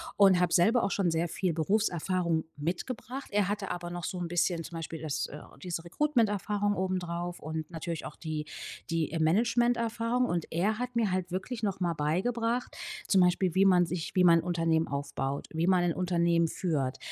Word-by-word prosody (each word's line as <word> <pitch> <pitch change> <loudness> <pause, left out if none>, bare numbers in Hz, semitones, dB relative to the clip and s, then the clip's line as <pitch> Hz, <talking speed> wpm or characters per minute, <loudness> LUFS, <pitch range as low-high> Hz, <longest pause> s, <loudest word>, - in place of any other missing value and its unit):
und 195 -3 +6
habe 180 -1 +2
selber 225 +7 +4
auch - - +1
schon 180 -4 +1
sehr 165 +1 0
viel 180 0 -1
Berufserfahrung 170 -2 0
mitgebracht. 220 - -4
Er 200 -1 +2
hatte 205 -2 -2
aber 175 0 -4
noch 175 -1 -4
so 185 - -4
'n 170 -1 -3
bisschen, 175 -1 +1
zum 165 - -7
Beispiel 160 -1 -6
das 155 -3 -2
äh, 150 - -9 0.2
diese 175 -2 -4
Recruitment-Erfahrung 205 - +1
obendrauf 175 -2 -2
und 155 +1 -5
natürlich 165 0 -5
auch - - -7
die 155 -2 -4 0.4
die, 165 -3 0
äh, 165 - -2
Management-Erfahrung. 230 +5 +2
Und 175 -8 -1
er 210 +7 0
hat 250 -1 -4
mir 220 -5 +2
halt 185 -1 -1
wirklich 220 +6 -4
noch 195 -3 -2
mal 170 -1 +1
beigebracht, 230 +11 -1 0.3
zum 195 - +4
Beispiel 180 0 +3
wie 195 +2 +4
man 180 -2 +5
sich 165 -1 -4
wie 180 - +5
man 170 -1 +7
'n - - -4
Unternehmen 165 -2 +1
aufbaut. 140 0 -3
Wie 165 +2 0
man 180 -2 +4
'n 170 -2 +1
Unternehmen 170 -2 +2
führt. 145 -8 -1
175 Hz, 190 wpm, -30 LUFS, 165-205 Hz, 0.4 s, man